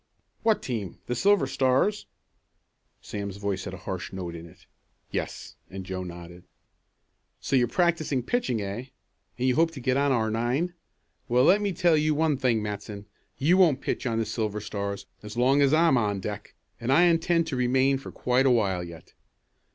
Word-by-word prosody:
"What 220 Hz, -1 st, +2 dB
team; 110 Hz, -8 st, -4 dB
the 125 Hz, -, -2 dB
Silver 200 Hz, -, +3 dB
Stars?" 135 Hz, +10 st, +1 dB, 1.0 s
Sam's 100 Hz, -1 st, -5 dB
voice 100 Hz, -1 st, -3 dB
had 95 Hz, -, -6 dB
a 90 Hz, -, -15 dB
harsh 95 Hz, -2 st, -4 dB
note 90 Hz, -3 st, -5 dB
in 85 Hz, 0 st, -9 dB
it. 80 Hz, -, -19 dB, 0.5 s
"Yes." -, -, -5 dB
And 95 Hz, 0 st, -7 dB
Joe 95 Hz, 0 st, -4 dB
nodded. 85 Hz, 0 st, -10 dB, 1.0 s
"So 135 Hz, -, -1 dB
you're 125 Hz, -2 st, +4 dB
practicing 155 Hz, -3 st, +1 dB
pitching, 125 Hz, -, -1 dB
eh? 100 Hz, +6 st, -5 dB, 0.5 s
And 125 Hz, +1 st, 0 dB
you 130 Hz, -, +3 dB
hope 165 Hz, +4 st, +3 dB
to 140 Hz, -, -7 dB
get 130 Hz, +1 st, 0 dB
on 140 Hz, 0 st, +2 dB
our 110 Hz, -4 st, +1 dB
nine. 125 Hz, +10 st, 0 dB, 0.5 s
Well 125 Hz, +1 st, +3 dB
let 200 Hz, +8 st, +5 dB
me 205 Hz, -1 st, 0 dB
tell 175 Hz, -2 st, +3 dB
you 155 Hz, 0 st, +2 dB
one 155 Hz, -1 st, +2 dB
thing, 120 Hz, -4 st, +1 dB
Matson; 105 Hz, 0 st, -6 dB, 0.3 s
you 165 Hz, +7 st, +3 dB
won't 165 Hz, -8 st, +4 dB
pitch -, -, -2 dB
on 115 Hz, -2 st, -1 dB
the 115 Hz, -, 0 dB
Silver 105 Hz, -2 st, -2 dB
Stars 100 Hz, -1 st, -4 dB, 0.2 s
as 105 Hz, +2 st, -9 dB
long 135 Hz, +4 st, +4 dB
as 140 Hz, -1 st, +4 dB
I'm 160 Hz, -3 st, +4 dB
on 105 Hz, -4 st, 0 dB
deck, 105 Hz, +2 st, -6 dB, 0.2 s
and 120 Hz, +3 st, -1 dB
I 160 Hz, +6 st, +6 dB
intend 170 Hz, -1 st, +3 dB
to 150 Hz, -, -3 dB
remain 130 Hz, +2 st, +2 dB
for -, -, -9 dB
quite 125 Hz, +2 st, +1 dB
a -, -, +5 dB
while 100 Hz, -7 st, +1 dB
yet. 85 Hz, -2 st, -11 dB
125 Hz, 185 wpm, -26 LUFS, 100-150 Hz, 1.0 s, I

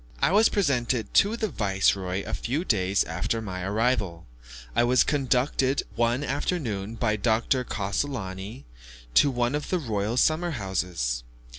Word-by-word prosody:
I -, -, +2 dB
was 215 Hz, +3 st, +5 dB
presented 125 Hz, -, 0 dB
to 210 Hz, +4 st, +4 dB
the 220 Hz, -, -1 dB
viceroy 95 Hz, -, 0 dB
a -, -, -6 dB
few 145 Hz, +9 st, -2 dB
days 100 Hz, -, +2 dB
after 90 Hz, +8 st, -2 dB
my 95 Hz, -4 st, -5 dB
arrival. 100 Hz, -3 st, 0 dB, 0.5 s
I -, -, +4 dB
was 125 Hz, +1 st, +4 dB
conducted 135 Hz, -1 st, +1 dB
one 120 Hz, +4 st, +1 dB
afternoon 120 Hz, -, -2 dB
by 110 Hz, -2 st, 0 dB
Dr. 115 Hz, +4 st, +1 dB
Cassolani 100 Hz, -1 st, -4 dB, 0.5 s
to 140 Hz, -, +5 dB
one 120 Hz, -1 st, 0 dB
of 150 Hz, 0 st, -3 dB
the 185 Hz, -, +1 dB
royal 110 Hz, -, -2 dB
summer 160 Hz, +6 st, +2 dB
houses. 90 Hz, -, -2 dB
115 Hz, 140 wpm, -26 LUFS, 95-135 Hz, 0.5 s, was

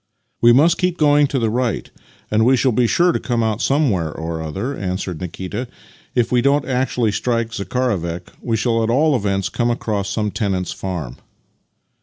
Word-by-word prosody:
" -, -, -50 dB
" -, -, -50 dB
We 120 Hz, -, +7 dB
must 155 Hz, +7 st, +4 dB
keep 180 Hz, -1 st, +1 dB
on 155 Hz, -, +4 dB
going 145 Hz, 0 st, +5 dB
to 140 Hz, -, -2 dB
the 115 Hz, -3 st, +1 dB
right, 125 Hz, 0 st, -1 dB, 0.4 s
and 110 Hz, +1 st, +3 dB
we 130 Hz, +3 st, +4 dB
shall 130 Hz, +1 st, +2 dB
be 120 Hz, +1 st, +2 dB
sure 175 Hz, -, +3 dB
to -, -, -1 dB
come 120 Hz, -3 st, -1 dB
out 110 Hz, 0 st, -1 dB
somewhere 115 Hz, -, +1 dB
or 80 Hz, +1 st, -5 dB
other," 95 Hz, -, -4 dB
answered 95 Hz, -4 st, -4 dB
Nikita. 95 Hz, +7 st, -5 dB, 0.2 s
" -, -, -29 dB
If 120 Hz, -2 st, +1 dB
we 125 Hz, -1 st, +3 dB
don't 140 Hz, +2 st, +2 dB
actually 125 Hz, -3 st, 0 dB
strike 115 Hz, +1 st, -1 dB
Zakharovek 95 Hz, -5 st, -2 dB
we 115 Hz, -2 st, -1 dB
shall 115 Hz, +1 st, +1 dB
at 110 Hz, -, 0 dB
all 145 Hz, +5 st, +3 dB
events 100 Hz, -4 st, 0 dB
come 120 Hz, -1 st, 0 dB
across 105 Hz, -4 st, -2 dB
some 105 Hz, 0 st, -1 dB
tenant's 95 Hz, -4 st, -1 dB
farm." 85 Hz, -10 st, -5 dB
115 Hz, 200 wpm, -20 LUFS, 95-130 Hz, 0.4 s, We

